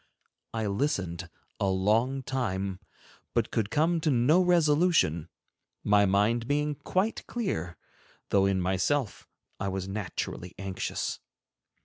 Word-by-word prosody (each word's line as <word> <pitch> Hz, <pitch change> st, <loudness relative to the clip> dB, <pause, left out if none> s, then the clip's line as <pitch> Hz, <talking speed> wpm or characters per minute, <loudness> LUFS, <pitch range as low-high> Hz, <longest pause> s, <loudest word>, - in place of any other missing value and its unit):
I 110 Hz, -1 st, -2 dB
listened 100 Hz, -, -1 dB, 0.3 s
a 100 Hz, -, +1 dB
long 110 Hz, +8 st, +1 dB
time, 100 Hz, -8 st, -2 dB, 0.6 s
but -, -, +1 dB
could 110 Hz, -2 st, 0 dB
come 160 Hz, +5 st, +2 dB
to 155 Hz, -, +1 dB
no 140 Hz, +7 st, +4 dB
resolution, 160 Hz, -, +3 dB, 0.5 s
my 105 Hz, -1 st, +4 dB
mind 110 Hz, +5 st, +2 dB
being 150 Hz, +1 st, +1 dB
quite 185 Hz, +9 st, -1 dB
clear, 90 Hz, -, -3 dB, 0.5 s
though 100 Hz, -1 st, +4 dB
in 95 Hz, -1 st, +1 dB
myself 95 Hz, +8 st, 0 dB, 0.3 s
I 100 Hz, -, -2 dB
was 95 Hz, -1 st, -3 dB
naturally 95 Hz, -3 st, -4 dB
anxious. 95 Hz, -1 st, -3 dB
110 Hz, 115 wpm, -28 LUFS, 95-145 Hz, 0.6 s, no